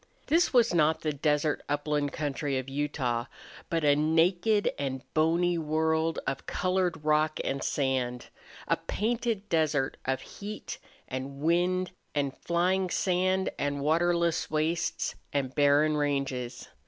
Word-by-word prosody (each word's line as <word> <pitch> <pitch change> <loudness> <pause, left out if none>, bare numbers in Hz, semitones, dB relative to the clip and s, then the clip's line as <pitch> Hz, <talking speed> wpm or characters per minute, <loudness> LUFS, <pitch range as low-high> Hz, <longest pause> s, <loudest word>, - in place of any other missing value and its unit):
This 335 +3 +3
was 240 -6 +4
not 160 -1 +3
the 155 -2 -1
desert 150 +1 +1
upland 145 0 0
country 145 -2 -2
of 130 0 -4
Utah, 135 -4 -1 0.4
but 165 -1 0
a 145 -1 +5
naked 175 +7 +2
and 135 -2 -3
bony 170 +2 +2
world 160 +1 +1
of 135 0 -3
colored 185 -4 0
rock 155 0 +2
and 135 0 -2
sand 130 -3 -1 0.4
a - - +2
painted 225 -1 -2
desert 155 -6 +1
of 130 0 0
heat 210 +7 -7 0.3
and 135 +1 -5
wind 175 +3 +1 0.2
and 140 -2 0
flying 180 +2 +1
sand 185 +1 +1
and 145 0 -1
waterless 170 +2 +1
wastes 155 +2 -1 0.2
and 135 -2 -1
barren 145 +2 +4
ranges. 135 -4 -2
155 Hz, 130 wpm, -29 LUFS, 140-175 Hz, 0.4 s, a